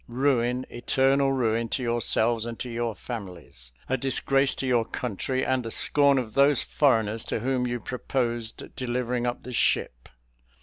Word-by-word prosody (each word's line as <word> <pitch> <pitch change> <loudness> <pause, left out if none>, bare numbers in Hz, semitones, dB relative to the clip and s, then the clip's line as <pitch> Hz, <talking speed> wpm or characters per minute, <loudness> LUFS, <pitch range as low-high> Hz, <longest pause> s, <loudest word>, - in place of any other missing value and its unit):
Ruin, 125 0 +1
eternal 135 +3 +2
ruin, 115 -3 0
to 130 - -2
yourselves 115 -1 +1
and 115 -1 -6
to - - -5
your 115 -1 -2
families; 90 - -9 0.2
a 130 - 0
disgrace 135 +1 +1
to - - -3
your 120 -3 +2
country, 125 +3 -3
and 130 -1 +1
the 115 - -5
scorn 140 +4 +3
of 115 -4 -3
those 140 0 +4
foreigners 115 -6 +1
to - - -3
whom 125 0 0
you 120 0 -2
proposed 120 -2 -3
delivering 125 -1 -2
up 120 - -3
the 125 - -7
ship. - - 0
120 Hz, 160 wpm, -26 LUFS, 115-130 Hz, 0.2 s, those